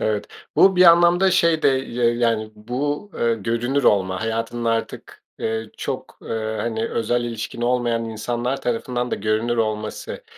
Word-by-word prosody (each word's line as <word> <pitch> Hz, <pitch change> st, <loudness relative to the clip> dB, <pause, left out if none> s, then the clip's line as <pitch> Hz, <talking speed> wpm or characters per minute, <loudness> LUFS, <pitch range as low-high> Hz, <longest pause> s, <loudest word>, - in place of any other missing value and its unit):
Evet. 105 Hz, -1 st, -1 dB, 0.3 s
Bu 190 Hz, -1 st, +6 dB
bir 180 Hz, -, +7 dB
anlamda 175 Hz, +2 st, +6 dB
şey 165 Hz, -3 st, +3 dB
de -, -, +5 dB
ya 125 Hz, -3 st, +1 dB
yani, 115 Hz, -2 st, 0 dB
bu, 145 Hz, -, -3 dB
eee, 115 Hz, -1 st, +2 dB
görünür 115 Hz, +6 st, -1 dB
olma, 95 Hz, -2 st, +2 dB
hayatının 115 Hz, +1 st, -3 dB
artık, 115 Hz, 0 st, -3 dB, 0.2 s
eee, 110 Hz, -1 st, -3 dB
çok, -, -, -5 dB
eee, 110 Hz, -1 st, -3 dB
hani, 115 Hz, -1 st, -2 dB
özel 120 Hz, +2 st, 0 dB
ilişkin 115 Hz, 0 st, -5 dB
olmayan 120 Hz, -2 st, +1 dB
insanlar 120 Hz, +4 st, -3 dB
tarafından 125 Hz, +1 st, -2 dB
da -, -, +1 dB
görünür 110 Hz, +3 st, 0 dB
olması, 110 Hz, -1 st, -3 dB
115 Hz, 150 wpm, -22 LUFS, 110-125 Hz, 0.3 s, bir